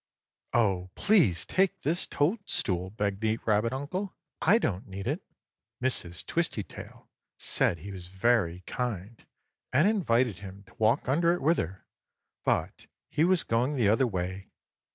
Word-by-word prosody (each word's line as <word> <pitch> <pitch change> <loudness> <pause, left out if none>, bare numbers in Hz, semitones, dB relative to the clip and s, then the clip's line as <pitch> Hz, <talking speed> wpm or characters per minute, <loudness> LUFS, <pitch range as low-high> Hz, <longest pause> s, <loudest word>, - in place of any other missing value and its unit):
"Oh, 95 -6 +2
please 145 - +3
take 190 0 +1
this 165 +5 +1
toadstool!" 145 - 0
begged 100 0 -2
the 110 0 +1
rabbit 110 +1 +2
uncle. 180 +9 -4 0.3
"I 200 +8 +5
don't 100 - -2
need 95 0 -6
it." 145 - -1 0.6
Mrs. 90 -9 -2
Twistytail 140 - -4 0.3
said 85 - +2
he 100 +6 -8
was 90 -2 -7
very 95 -2 +1
kind, 115 -3 -4 0.5
and 155 +9 +4
invited 125 - +2
him 100 0 -10
to - - -20
walk 110 +3 +2
under 170 +6 +3
it 175 - -3
with 165 +4 +3
her, 90 +3 -5 0.6
but - - -1 0.2
he 155 - +2
was 180 0 +4
going 125 +6 +1
the 115 -6 +3
other 125 +5 +3
way. 95 -1 -4
115 Hz, 145 wpm, -29 LUFS, 95-150 Hz, 0.6 s, I